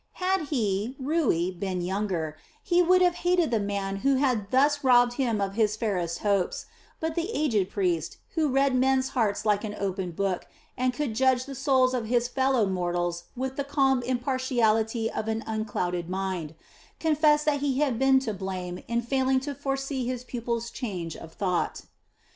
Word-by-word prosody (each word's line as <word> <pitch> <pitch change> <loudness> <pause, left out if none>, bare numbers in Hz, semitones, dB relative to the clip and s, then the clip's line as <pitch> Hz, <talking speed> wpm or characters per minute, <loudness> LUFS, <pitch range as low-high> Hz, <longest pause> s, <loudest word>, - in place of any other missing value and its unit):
Had 370 -3 0
he, 220 -3 -1
Rui, 260 - +1
been 185 0 -3
younger, 180 -4 -2 0.3
he 355 -4 +3
would 365 +1 +5
have 355 -1 +4
hated 355 -3 +2
the 225 - +2
man 200 -1 -2
who 275 +6 +2
had 250 -7 +1
thus 285 +4 +3
robbed 245 -2 +5
him 245 -5 0
of 195 -1 -1
his 215 -1 +2
fairest 185 -7 -2
hopes; 200 -3 +1 0.3
but 320 0 -2
the 340 +4 -2
aged 225 - +1
priest, 175 -6 -1 0.2
who 315 -3 +1
read 270 0 +2
men's 260 +1 +2
hearts 215 -5 0
like 210 0 +2
an 210 -1 -4
open 190 -2 -2
book 185 +1 -2 0.3
and 255 0 +1
could 250 -2 -3
judge 255 +1 +2
the 280 - -7
souls 260 -1 +2
of 240 -3 -2
his 240 +1 +2
fellow 260 -3 +2
mortals 175 -2 -2
with 260 +1 -4
the 280 - 0
calm 270 -2 +2
impartiality 240 -3 +1
of 215 - -4
an 225 0 -1
unclouded 180 -6 -2
mind, 185 -4 -3 0.4
confessed 300 -1 +3
that 295 -2 +2
he 275 -2 0
had 270 -5 +1
been 270 0 +5
to 230 -5 -3
blame 185 -2 -5
in 235 0 0
failing 265 +1 +2
to 285 +2 -5
foresee 270 -1 -3
his 250 -1 -3
pupil's 235 -1 -3
change 180 - -5
of 165 - -10
thought. 180 -2 -1
240 Hz, 175 wpm, -27 LUFS, 195-270 Hz, 0.4 s, would